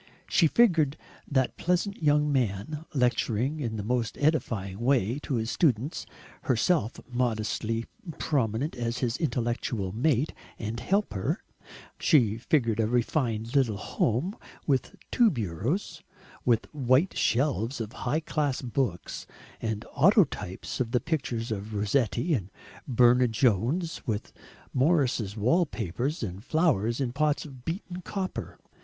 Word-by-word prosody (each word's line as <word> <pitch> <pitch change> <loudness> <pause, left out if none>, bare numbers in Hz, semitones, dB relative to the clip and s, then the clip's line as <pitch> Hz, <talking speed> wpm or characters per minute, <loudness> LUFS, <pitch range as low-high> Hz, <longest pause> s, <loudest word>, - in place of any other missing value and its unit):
She 165 - +4
figured 160 - +3 0.3
that 130 -3 +1
pleasant 180 +3 0
young 150 -1 +3
man, 130 +4 -1
lecturing 125 +1 +1
in 115 -6 -2
the 105 - -3
most 115 +1 -1
edifying 110 - 0
way 120 0 +2
to 145 -2 -3
his 115 +1 -1
students, 135 -2 +1 0.3
herself 130 - +1
modestly 115 -2 -1 0.3
prominent 130 0 0
as 120 -1 -2
his 125 -2 0
intellectual 120 - -1
mate 130 +6 +1 0.2
and 110 +1 -4
helper; 185 - 0 0.6
she 115 -7 +4
figured 115 -4 +1
a 110 - +3
refined 120 -1 0
little 120 -7 +3
home, 125 - -1 0.3
with 135 -4 0 0.2
two 240 -3 +5
bureaus, 125 - -2 0.4
with 115 -2 +3
white 135 +5 +2
shelves 125 -1 +1
of 110 -1 -4
high 145 +6 -1
class 145 -4 -1
books, 120 -8 -2 0.3
and 110 -1 -3
autotypes 160 - +2
of 125 -3 0
the 125 - +4
pictures 125 -8 -2
of 105 +1 -4
Rossetti 115 - +1
and 100 -9 -1 0.4
Burne 125 -1 +5
Jones, 125 - +1
with 110 -2 -3 0.4
Morris's 130 - +2
wall 160 - +3
papers 120 - -3
and 95 -1 -5
flowers 130 - +1
in 125 -3 -1
pots 150 +2 +1
of 130 -4 -11
beaten 180 +1 -4
copper. 190 +1 -4
125 Hz, 125 wpm, -28 LUFS, 110-150 Hz, 0.6 s, two